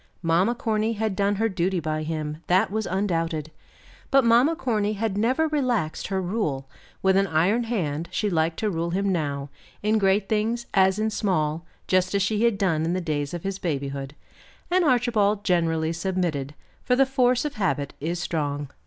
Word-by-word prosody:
Mamma 175 +8 +2
Corny 220 -1 0
had 215 -2 -2
done 200 +1 +1
her 225 +3 +1
duty 185 -2 0
by 155 -1 -2
him, 155 -1 -3
that 185 +3 +3
was 220 0 -2
undoubted; 165 -5 -1 0.6
but 270 -2 +4
Mamma 245 +8 +5
Corny 215 -9 0
had 215 -1 -2
never 255 +10 +2
relaxed 250 - -1
her 190 -1 -1
rule; 175 -9 -2 0.4
with 190 0 +4
an 195 0 +3
iron 185 +9 +2
hand 170 -9 -2
she 215 - -1
liked 160 -3 0
to 215 - 0
rule 170 -1 -2
him 195 +3 0
now, 145 -5 -2 0.3
in 215 +1 +2
great 195 0 +2
things 225 +3 0
as 190 0 +4
in 220 +1 0
small, 160 -6 -1 0.2
just 185 +1 +1
as 200 - +2
she 210 +2 0
had 235 -3 +3
done 165 -5 +1
in 165 +2 0
the 185 - 0
days 150 -5 -2
of 175 - -6
his 195 0 -3
babyhood. 140 -3 -3 0.6
And 365 0 +4
Archibald 230 -7 +2
generally 165 -4 +1
submitted, 165 -6 -2 0.3
for 250 - +2
the 270 +1 +5
force 255 -1 +2
of 295 - -2
habit 155 -9 -1
is 170 +4 -2
strong. 145 -5 -2
190 Hz, 180 wpm, -25 LUFS, 160-220 Hz, 0.6 s, Mamma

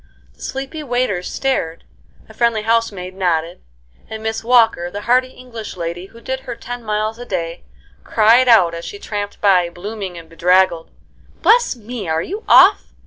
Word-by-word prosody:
The - - -23
sleepy 270 +4 -5
waiters 245 -9 -1
stared, 170 -12 -2 0.4
a 220 - -14
friendly 225 -1 +1
housemaid 215 -5 -1
nodded, 175 -3 -1 0.5
and 220 0 -7
Miss 220 0 -3
Walker, 225 -7 +3
the 205 +3 -6
hearty 250 +3 +2
English 235 -6 -9
lady 170 +2 -5
who 230 - -16
did 260 +3 -4
her 255 -2 -7
ten 245 +1 -7
miles 215 +1 -2
a 245 - -7
day, 170 -2 -4 0.4
cried 230 +4 +4
out, 185 -8 +5
as 170 0 -6
she 410 - -7
tramped 205 - -5
by, 180 -4 +4
blooming 190 0 -7
and 165 -1 -11
bedraggled: 175 0 +2 0.5
"Bless 480 - +4
me, 225 -5 -7
are 160 0 0
you 415 +5 -6
off?" - - +6
215 Hz, 165 wpm, -18 LUFS, 180-245 Hz, 0.5 s, off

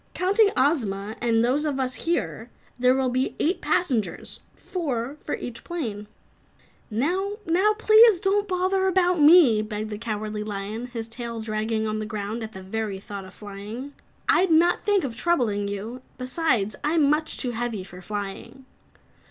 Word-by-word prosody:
"Counting 400 +4 +4
Ozma 220 -8 +1
and 230 -1 +3
those 270 +5 +1
of 290 -3 -1
us 255 -1 -1
here, 290 -8 -2 0.3
there 250 +1 +4
will 265 -1 +1
be 255 +2 -1
eight 345 +5 0
passengers 250 - -1 0.2
four 280 -8 -3
for - - -2
each 245 -1 -7
plane." 225 -12 -4 0.8
"Now 360 - -1 0.4
please 435 -2 +7
don't 405 +2 +1
bother 380 +1 +1
about 360 -2 +2
me!" 295 -8 +7
begged 215 0 -5
the 210 - -5
Cowardly 215 -1 -3
Lion, 210 +3 -4
his 230 -2 -6
tail 230 0 -6
dragging 220 0 -2
on 215 0 -2
the 215 - -4
ground 215 +1 -4
at 220 0 -6
the 190 - -9
very 205 0 -3
thought 200 0 -8
of 185 - -14
flying. 210 +7 -8 0.3
"I'd 375 +1 +4
not 335 +2 +4
think 410 -3 +2
of 250 -5 -4
troubling 230 -10 +1
you. 215 +5 -5 0.2
Besides, 255 - 0
I'm 300 0 +3
much 305 +2 +1
too 250 - 0
heavy 230 -4 -3
for 180 -1 -12
flying." 205 +7 -6
240 Hz, 160 wpm, -25 LUFS, 215-320 Hz, 0.8 s, please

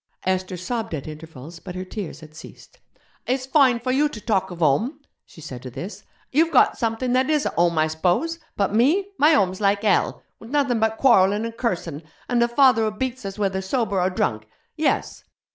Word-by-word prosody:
Esther 185 0 -1
sobbed 220 +1 -3
at 140 - -7
intervals, 155 0 -10
but 180 +1 -9
her 185 0 -5
tears 185 -6 -7
had 155 -1 -13
ceased. - - -14 0.5
'It's 255 +1 0
fine 265 -3 +4
for 255 +2 -2
you 290 +3 +2
to 225 - -8
talk 205 -3 0
of 175 - -8
home,' 195 - +1 0.3
she - - -16
said 130 -5 -8
to 130 - -7
this. 155 - -8 0.3
'You've 320 +4 +3
got 265 - +4
something 230 +2 -1
that 260 +2 +2
is 300 -2 +2
a - - +1
home, 170 -1 +1
I 155 - +4
s'pose? 180 - 0 0.2
But 200 0 0
me! 310 - +3
my 300 +3 +6
home's 190 -8 +1
like 200 0 +2
hell, 210 - +1 0.2
with 225 - -12
nothing 275 -4 +1
but 220 0 +1
quarrellin' 205 -4 +4
and 230 0 -6
cursin', 175 - -3 0.3
and 245 -1 +1
a 235 - +4
father 245 -1 +4
who 215 -1 -3
beats 260 -2 -3
us 195 - -7
whether 195 -2 -1
sober 200 -2 -1
or 180 - +2
drunk. 110 - -2 0.3
Yes!' - - -1
210 Hz, 205 wpm, -23 LUFS, 180-255 Hz, 0.5 s, my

